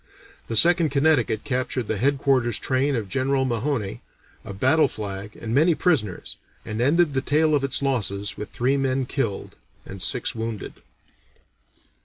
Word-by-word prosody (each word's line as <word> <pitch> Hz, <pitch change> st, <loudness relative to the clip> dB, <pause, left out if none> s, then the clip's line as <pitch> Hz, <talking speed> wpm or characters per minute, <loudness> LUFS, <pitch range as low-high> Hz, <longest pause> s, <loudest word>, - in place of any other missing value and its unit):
The 115 Hz, -, -3 dB
Second 170 Hz, -, +5 dB
Connecticut 140 Hz, -6 st, +1 dB
captured 125 Hz, -2 st, -2 dB
the 110 Hz, -, -1 dB
headquarters 135 Hz, -3 st, +1 dB
train 135 Hz, +2 st, 0 dB
of 110 Hz, -4 st, -3 dB
General 130 Hz, +5 st, 0 dB
Mahone, 120 Hz, -, -2 dB, 0.4 s
a -, -, -8 dB
battle 130 Hz, +11 st, +3 dB
flag, 100 Hz, 0 st, -7 dB
and 115 Hz, 0 st, -4 dB
many 160 Hz, +5 st, +4 dB
prisoners, 130 Hz, -, -1 dB, 0.3 s
and 110 Hz, +2 st, -4 dB
ended 150 Hz, +4 st, +3 dB
the 130 Hz, -, 0 dB
tale 155 Hz, +2 st, +2 dB
of 145 Hz, -2 st, +2 dB
its 140 Hz, 0 st, 0 dB
losses 105 Hz, -7 st, -1 dB
with 105 Hz, -, -7 dB
three 130 Hz, +3 st, 0 dB
men 135 Hz, -1 st, 0 dB
killed 125 Hz, -7 st, -4 dB, 0.3 s
and 95 Hz, -1 st, -9 dB
six 120 Hz, -, +1 dB
wounded. 110 Hz, -2 st, -6 dB
130 Hz, 150 wpm, -23 LUFS, 110-140 Hz, 0.4 s, Second